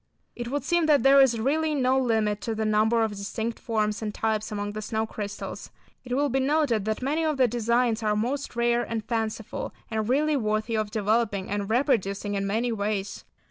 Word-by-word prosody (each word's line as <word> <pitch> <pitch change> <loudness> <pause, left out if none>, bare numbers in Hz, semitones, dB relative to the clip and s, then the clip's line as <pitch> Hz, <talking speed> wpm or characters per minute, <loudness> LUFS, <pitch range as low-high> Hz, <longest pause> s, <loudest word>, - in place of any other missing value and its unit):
It 240 -1 -5
would 280 +2 -2
seem 340 +2 +2
that 290 -6 +4
there 275 0 +7
is 240 -4 +3
really 305 +6 +1
no 260 -1 +2
limit 220 -5 +1
to 225 -2 -3
the 220 0 -1
number 215 +2 +3
of 220 - 0
distinct 220 +3 -4
forms 215 -2 -1
and 215 -1 -2
types 215 0 -1
among 205 0 -3
the 215 +1 -5
snow 220 +1 -1
crystals. 205 -2 -6 0.3
It 250 -1 -3
will 290 +2 +2
be 270 0 0
noted 265 -6 +1
that 220 +3 -2
many 300 +5 0
of 310 -3 0
the 255 -2 +4
designs 235 0 +1
are 210 -1 +1
most 250 +5 -2
rare 235 0 +2
and 225 -3 -4
fanciful, 225 -2 -3 0.2
and 220 0 -1
really 300 +4 +2
worthy 215 -2 -1
of 215 -1 -1
developing 210 -2 0
and 205 0 -2
reproducing 220 -5 +1
in 195 0 -1
many 230 +4 0
ways. 205 -2 -3
225 Hz, 200 wpm, -26 LUFS, 215-255 Hz, 0.3 s, there